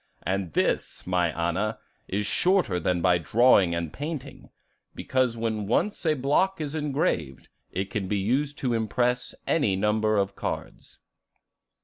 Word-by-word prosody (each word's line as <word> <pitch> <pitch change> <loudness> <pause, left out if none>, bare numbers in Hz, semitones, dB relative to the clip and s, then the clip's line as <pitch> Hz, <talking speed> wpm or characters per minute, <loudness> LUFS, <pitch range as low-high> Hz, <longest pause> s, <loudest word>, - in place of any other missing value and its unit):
And 95 -4 -2
this, - - 0
my 90 -2 +1
Anna, 85 +7 -1 0.3
is 100 +2 -1
shorter 180 - +2
than 90 0 0
by 90 -1 +4
drawing 95 - +4
and 85 -2 -3
painting, 150 0 -6 0.5
because 130 -3 0
when 110 -3 -2
once 175 - 0
a 155 - +3
block 150 +8 +1
is 150 -2 -3
engraved, 140 - -1 0.2
it 95 +2 -3
can 105 -5 -2
be 105 - 0
used 135 +9 0
to 125 -3 -1
impress 120 +2 0
any 125 -12 +2
number 105 +2 +1
of 100 0 0
cards." - - -6
110 Hz, 140 wpm, -26 LUFS, 95-135 Hz, 0.5 s, by